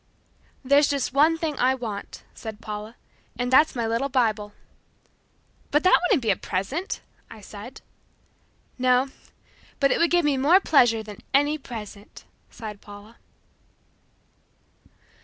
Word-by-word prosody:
"There's 280 Hz, +2 st, +5 dB
just 275 Hz, -3 st, -1 dB
one 310 Hz, +4 st, +4 dB
thing 315 Hz, -3 st, -3 dB
I 260 Hz, +1 st, +3 dB
want," 220 Hz, -5 st, -7 dB
said 220 Hz, -2 st, -8 dB
Paula, 215 Hz, +1 st, -7 dB, 0.4 s
"and 245 Hz, +1 st, -2 dB
that's 300 Hz, +3 st, +5 dB
my 235 Hz, -2 st, -1 dB
little 230 Hz, +5 st, -1 dB
Bible." 220 Hz, -5 st, 0 dB, 1.2 s
"But 295 Hz, +1 st, +2 dB
that 370 Hz, -, +6 dB
wouldn't 360 Hz, -, +2 dB
be 220 Hz, -, +2 dB
a -, -, +2 dB
present," 255 Hz, -, -4 dB, 0.3 s
I 225 Hz, -, -12 dB
said. 210 Hz, +5 st, -11 dB, 1.0 s
"No, 255 Hz, +1 st, +3 dB, 0.7 s
but 275 Hz, -1 st, +3 dB
it -, -, +1 dB
would 335 Hz, -, +3 dB
give 350 Hz, -2 st, +2 dB
me 285 Hz, -2 st, +2 dB
more 305 Hz, +8 st, +5 dB
pleasure 240 Hz, -, +3 dB
than 210 Hz, -1 st, -11 dB
any 290 Hz, +2 st, +2 dB
present," 215 Hz, -5 st, -10 dB, 0.2 s
sighed 210 Hz, -3 st, -9 dB
Paula. 205 Hz, +2 st, -13 dB
250 Hz, 135 wpm, -24 LUFS, 215-290 Hz, 1.2 s, that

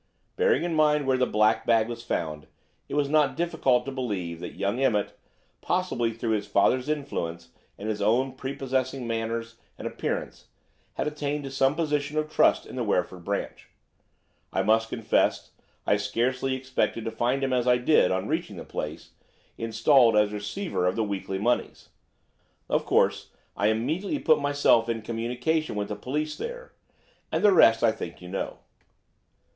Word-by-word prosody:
Bearing 465 Hz, 0 st, +2 dB
in 175 Hz, -1 st, -1 dB
mind 150 Hz, -2 st, +3 dB
where 130 Hz, -1 st, +2 dB
the 125 Hz, -, +3 dB
black 110 Hz, +1 st, +2 dB
bag 115 Hz, -1 st, +3 dB
was 120 Hz, -1 st, -6 dB
found, 75 Hz, -9 st, -3 dB, 0.4 s
it -, -, -4 dB
was 145 Hz, -1 st, +2 dB
not 145 Hz, -2 st, +2 dB
difficult 135 Hz, -7 st, +1 dB
to 135 Hz, -, -4 dB
believe 100 Hz, -11 st, -3 dB
that -, -, -7 dB
young 100 Hz, +5 st, -1 dB
Emmett, 110 Hz, -7 st, +1 dB, 0.5 s
possibly 175 Hz, -11 st, 0 dB
through 115 Hz, 0 st, -3 dB
his 105 Hz, -2 st, -1 dB
father's 125 Hz, +7 st, +2 dB
influence 85 Hz, -, -3 dB, 0.3 s
and 105 Hz, -, -6 dB
his 105 Hz, -1 st, -2 dB
own 125 Hz, +6 st, +2 dB
prepossessing 130 Hz, -1 st, -3 dB
manners 115 Hz, 0 st, -3 dB, 0.2 s
and -, -, -8 dB
appearance, -, -, -4 dB, 0.5 s
had -, -, -1 dB
attained 150 Hz, -1 st, -2 dB
to 135 Hz, -, -6 dB
some 135 Hz, +1 st, +2 dB
position 150 Hz, -2 st, -1 dB
of 155 Hz, 0 st, -1 dB
trust -, -, +3 dB
in -, -, -10 dB
the 125 Hz, -, 0 dB
Wreford 90 Hz, -4 st, -1 dB
branch. 100 Hz, +3 st, -4 dB, 0.8 s
I -, -, 0 dB
must 110 Hz, +2 st, +2 dB
confess 115 Hz, -2 st, 0 dB, 0.3 s
I -, -, +3 dB
scarcely 130 Hz, +2 st, -1 dB
expected 130 Hz, -3 st, -2 dB
to 115 Hz, -, -2 dB
find 125 Hz, +4 st, 0 dB
him 135 Hz, -1 st, 0 dB
as 125 Hz, -1 st, +1 dB
I 125 Hz, 0 st, +5 dB
did, 125 Hz, -4 st, +4 dB
on 95 Hz, 0 st, -1 dB
reaching -, -, -2 dB
the -, -, -8 dB
place, -, -, -6 dB, 0.4 s
installed 115 Hz, +1 st, +4 dB
as 105 Hz, 0 st, +3 dB
receiver 105 Hz, -, -2 dB
of 90 Hz, -, 0 dB
the 115 Hz, -, 0 dB
weekly 100 Hz, -2 st, -3 dB
moneys. 120 Hz, +5 st, -1 dB, 0.8 s
Of -, -, 0 dB
course, -, -, +2 dB, 0.3 s
I 100 Hz, -, +1 dB
immediately 155 Hz, -, 0 dB
put 155 Hz, -, +3 dB
myself 145 Hz, -5 st, +3 dB
in 115 Hz, -1 st, -2 dB
communication 120 Hz, +7 st, -1 dB
with 100 Hz, 0 st, -3 dB
the 105 Hz, -, -3 dB
police 150 Hz, +8 st, -3 dB
there, -, -, -7 dB, 0.6 s
and -, -, 0 dB
the 205 Hz, -, +7 dB
rest 115 Hz, -10 st, +6 dB
I 115 Hz, -, +5 dB
think 85 Hz, -6 st, -7 dB
you 90 Hz, -, -10 dB
know." 95 Hz, -, -4 dB
120 Hz, 170 wpm, -26 LUFS, 110-145 Hz, 0.8 s, the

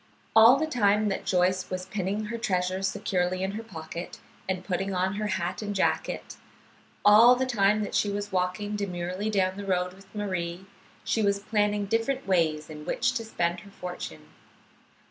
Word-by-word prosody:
All 225 Hz, +3 st, +9 dB
the 315 Hz, -, 0 dB
time 215 Hz, -7 st, +2 dB
that 195 Hz, -, -4 dB
Joyce 185 Hz, 0 st, +1 dB
was 185 Hz, 0 st, -4 dB
pinning 195 Hz, +2 st, -2 dB
her 235 Hz, +2 st, -4 dB
treasure 185 Hz, -4 st, 0 dB
securely 185 Hz, -1 st, -1 dB
in 190 Hz, -, -1 dB
her 215 Hz, +2 st, -5 dB
pocket 170 Hz, -5 st, -8 dB, 0.3 s
and 185 Hz, -1 st, -2 dB
putting 195 Hz, +1 st, -2 dB
on 185 Hz, +1 st, +1 dB
her 210 Hz, 0 st, -1 dB
hat 185 Hz, -2 st, -2 dB
and 205 Hz, -1 st, -4 dB
jacket, 190 Hz, -, -1 dB, 0.7 s
all 225 Hz, +4 st, +8 dB
the 260 Hz, +1 st, 0 dB
time 215 Hz, -3 st, +2 dB
that -, -, -5 dB
she 205 Hz, -, +2 dB
was 205 Hz, 0 st, -3 dB
walking 185 Hz, +3 st, -1 dB
demurely 185 Hz, 0 st, -3 dB
down 190 Hz, -2 st, +1 dB
the 205 Hz, -, -5 dB
road 180 Hz, -2 st, 0 dB
with 195 Hz, +1 st, -17 dB
Marie, 185 Hz, -3 st, -3 dB, 0.4 s
she 225 Hz, -, 0 dB
was 200 Hz, -1 st, +2 dB
planning 205 Hz, 0 st, 0 dB
different 230 Hz, +6 st, -1 dB
ways 160 Hz, -5 st, +1 dB
in 150 Hz, -1 st, -9 dB
which 255 Hz, +10 st, 0 dB
to 235 Hz, -2 st, -2 dB
spend 175 Hz, -5 st, -1 dB
her 200 Hz, -, -14 dB
fortune. 175 Hz, -, -7 dB
195 Hz, 175 wpm, -27 LUFS, 180-210 Hz, 0.7 s, All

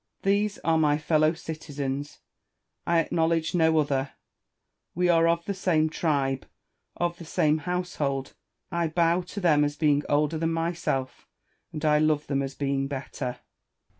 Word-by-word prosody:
These 200 Hz, +1 st, +1 dB
are 160 Hz, -1 st, +3 dB
my 150 Hz, -1 st, +3 dB
fellow 155 Hz, 0 st, +2 dB
citizens: 145 Hz, -4 st, -5 dB, 0.7 s
I 170 Hz, -, +3 dB
acknowledge 165 Hz, 0 st, +1 dB
no 160 Hz, -2 st, +3 dB
other; 140 Hz, -2 st, 0 dB, 0.8 s
we 180 Hz, +1 st, +2 dB
are 165 Hz, -1 st, +5 dB
of 170 Hz, 0 st, +1 dB
the 200 Hz, -, -2 dB
same 160 Hz, -5 st, +1 dB
tribe, 140 Hz, -5 st, 0 dB, 0.5 s
of 175 Hz, 0 st, -1 dB
the -, -, -8 dB
same 155 Hz, -1 st, +1 dB
household; 150 Hz, -7 st, -2 dB, 0.4 s
I 170 Hz, -1 st, 0 dB
bow 170 Hz, +2 st, +2 dB
to 180 Hz, +3 st, -7 dB
them 155 Hz, -6 st, +4 dB
as 145 Hz, 0 st, -1 dB
being 150 Hz, -2 st, +2 dB
older 150 Hz, +2 st, +1 dB
than 165 Hz, 0 st, 0 dB
myself, 165 Hz, -5 st, -2 dB, 0.4 s
and 155 Hz, +1 st, -4 dB
I 150 Hz, 0 st, +4 dB
love 155 Hz, -1 st, +2 dB
them 140 Hz, -1 st, -1 dB
as 135 Hz, 0 st, -4 dB
being 135 Hz, -1 st, -1 dB
better. 130 Hz, -2 st, -5 dB
155 Hz, 150 wpm, -26 LUFS, 145-170 Hz, 0.8 s, are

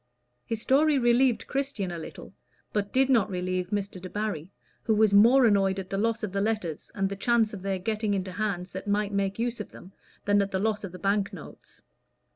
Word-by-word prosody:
His 225 Hz, -2 st, -2 dB
story 285 Hz, +5 st, +3 dB
relieved 240 Hz, 0 st, +3 dB
Christian 270 Hz, -9 st, -2 dB
a 170 Hz, -, -5 dB
little, 160 Hz, -, -10 dB, 0.4 s
but 205 Hz, -1 st, -1 dB
did 265 Hz, 0 st, +3 dB
not 235 Hz, -7 st, +3 dB
relieve 180 Hz, -1 st, -2 dB
Mr. 200 Hz, -3 st, -3 dB
Debarry, 190 Hz, -3 st, -4 dB, 0.3 s
who 220 Hz, -, +1 dB
was 215 Hz, -1 st, +4 dB
more 240 Hz, +6 st, +7 dB
annoyed 195 Hz, -3 st, +3 dB
at 190 Hz, -1 st, -6 dB
the 195 Hz, -, -1 dB
loss 225 Hz, +1 st, 0 dB
of 210 Hz, -, -2 dB
the 195 Hz, -, 0 dB
letters, 210 Hz, -7 st, -2 dB
and 195 Hz, -2 st, +1 dB
the 200 Hz, -, -4 dB
chance 225 Hz, +1 st, +2 dB
of 200 Hz, -, -7 dB
their 195 Hz, 0 st, -1 dB
getting 215 Hz, +2 st, -1 dB
into 190 Hz, -1 st, -3 dB
hands 190 Hz, -2 st, -3 dB
that 190 Hz, +3 st, -7 dB
might 205 Hz, 0 st, 0 dB
make 200 Hz, 0 st, -1 dB
use 235 Hz, 0 st, -2 dB
of 210 Hz, -, -6 dB
them, 185 Hz, -, -13 dB, 0.3 s
than 205 Hz, 0 st, +4 dB
at 200 Hz, -, -1 dB
the 190 Hz, -, -1 dB
loss 210 Hz, +1 st, -1 dB
of 195 Hz, -, -5 dB
the 180 Hz, -, -9 dB
bank 200 Hz, +1 st, 0 dB
notes. 175 Hz, -7 st, -12 dB
205 Hz, 215 wpm, -27 LUFS, 190-225 Hz, 0.4 s, more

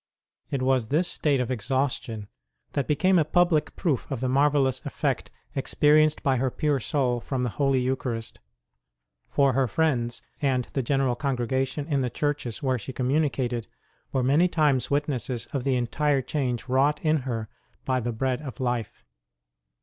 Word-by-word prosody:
It 135 Hz, -2 st, -1 dB
was 130 Hz, -3 st, +2 dB
this 160 Hz, +8 st, +2 dB
state 145 Hz, -5 st, +1 dB
of 125 Hz, 0 st, -1 dB
exhaustion 125 Hz, -3 st, -1 dB, 0.4 s
that 140 Hz, -, -1 dB
became 180 Hz, +5 st, +3 dB
a -, -, +4 dB
public 165 Hz, -1 st, +2 dB
proof 150 Hz, -9 st, -1 dB
of 135 Hz, -, -3 dB
the 130 Hz, -, -1 dB
marvellous 135 Hz, 0 st, +2 dB
effect 145 Hz, -2 st, -2 dB, 0.3 s
experienced 150 Hz, +2 st, +3 dB
by 135 Hz, -2 st, +2 dB
her 130 Hz, +2 st, +1 dB
pure 145 Hz, +2 st, 0 dB
soul 125 Hz, -1 st, 0 dB
from 130 Hz, +1 st, -3 dB
the 120 Hz, -, -1 dB
Holy 135 Hz, -1 st, +2 dB
Eucharist, 125 Hz, -3 st, -3 dB, 0.9 s
for 140 Hz, -2 st, +3 dB
her 130 Hz, +1 st, +2 dB
friends 120 Hz, -5 st, 0 dB, 0.2 s
and 130 Hz, -4 st, +1 dB
the 135 Hz, -, 0 dB
general 135 Hz, 0 st, +1 dB
congregation 130 Hz, +2 st, -1 dB
in 145 Hz, -3 st, 0 dB
the 125 Hz, -, 0 dB
churches 145 Hz, -2 st, -2 dB
where 130 Hz, -2 st, +1 dB
she 130 Hz, -, -7 dB
communicated 125 Hz, -3 st, 0 dB, 0.4 s
were 130 Hz, -2 st, 0 dB
many 145 Hz, +8 st, +4 dB
times 150 Hz, -7 st, +2 dB
wit 145 Hz, +1 st, +1 dB
nesses 125 Hz, -4 st, -2 dB
of 135 Hz, -3 st, -1 dB
the 135 Hz, -2 st, +2 dB
entire 135 Hz, +3 st, +1 dB
change 125 Hz, -5 st, -2 dB
wrought 135 Hz, +3 st, +2 dB
in 155 Hz, 0 st, +4 dB
her 120 Hz, -5 st, -3 dB, 0.4 s
by 130 Hz, -1 st, +1 dB
the 120 Hz, 0 st, -2 dB
Bread 130 Hz, +3 st, -1 dB
of 140 Hz, -2 st, -8 dB
Life. 120 Hz, -4 st, -2 dB
135 Hz, 165 wpm, -26 LUFS, 125-145 Hz, 0.9 s, a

